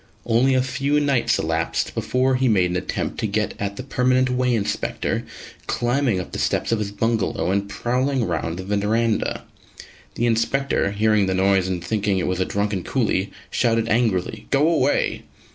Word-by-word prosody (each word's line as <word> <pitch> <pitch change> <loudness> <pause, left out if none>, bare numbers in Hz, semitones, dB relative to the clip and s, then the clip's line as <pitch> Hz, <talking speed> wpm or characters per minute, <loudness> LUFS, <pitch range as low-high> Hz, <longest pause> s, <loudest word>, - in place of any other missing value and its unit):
Only 125 +3 +3
a 130 - +3
few 135 +3 0
nights 140 -4 +2
elapsed 80 +1 -1
before 130 +1 +1
he 130 0 +2
made 95 -6 +3
an - - -2
attempt 90 - -3
to 110 - 0
get 105 +1 -1
at 100 0 -3
the 130 - -6
Permanent 130 0 +1
Way 125 -1 +1
Inspector, 105 -2 -2 0.4
climbing 120 -4 +1
up 90 - -6
the - - -5
steps - - 0
of 115 - +1
his 105 -1 -3
bungalow 110 -5 0
and 100 +1 -1
prowling 125 +4 0
round 85 -1 -2
the 95 +3 -2
verandah. 110 +2 0 0.7
The 120 - 0
Inspector, 115 -1 +1
hearing 105 -1 +2
the 95 - 0
noise 95 0 +3
and 90 -2 -3
thinking 105 -1 0
it 90 - 0
was 90 0 -1
a 95 - +1
drunken 100 -2 -1
coolie, 105 -6 0 0.2
shouted 115 -2 +1
angrily 110 -2 0
"Go 145 +2 +3
away!" 165 - +1
110 Hz, 175 wpm, -22 LUFS, 100-125 Hz, 0.7 s, Only